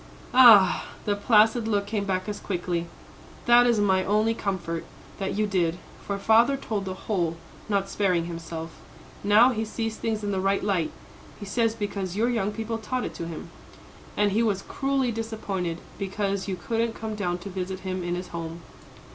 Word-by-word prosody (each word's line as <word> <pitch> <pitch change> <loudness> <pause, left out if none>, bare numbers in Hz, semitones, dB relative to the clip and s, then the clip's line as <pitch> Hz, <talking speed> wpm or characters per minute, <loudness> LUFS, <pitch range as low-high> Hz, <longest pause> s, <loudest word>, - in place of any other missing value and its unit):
"Ah," 225 -7 +7 0.2
the 205 - +1
placid 220 +2 +4
look 205 -2 +1
came 205 -1 -2
back 185 -1 -1
as 210 -1 -4
quickly 175 -2 -2 0.6
"that 240 0 +6
is 235 -3 +3
my 190 -2 +3
only 215 +3 +2
comfort 185 -6 -3 0.4
that 195 -1 -2
you 215 +1 +1
did. 175 -4 0 0.3
For 200 - -3
father 230 +7 +4
told 210 -7 -3
the 185 -1 -4
whole, 170 -6 0 0.3
not 200 -2 +1
sparing 180 -5 +1
himself. 165 -1 -6 0.5
Now 215 +5 +6
he 220 -2 -1
sees 225 0 -3
things 220 -2 -2
in 205 - -1
the 190 - 0
right 195 +1 +1
light; 185 -6 +1 0.5
he 205 - -7
says 225 +2 +1
because 200 -4 -3
your 230 +4 +2
young 210 -4 0
people 225 +1 -4
taught 250 +4 -2
it - - -5
to 170 - -5
him. 165 -2 -8 0.7
And 205 -1 +3
he 215 +4 +2
was 205 -4 0
cruelly 270 -2 0
disappointed 210 -6 -3 0.2
because 195 0 -2
you 190 - -1
couldn't 230 +5 -1
come 220 -1 -5
down 180 -4 -1
to 180 +3 -8
visit 185 0 -4
him 185 -1 -3
in 175 0 -1
his 180 0 -6
home." 165 0 -6
200 Hz, 180 wpm, -26 LUFS, 185-220 Hz, 0.7 s, Ah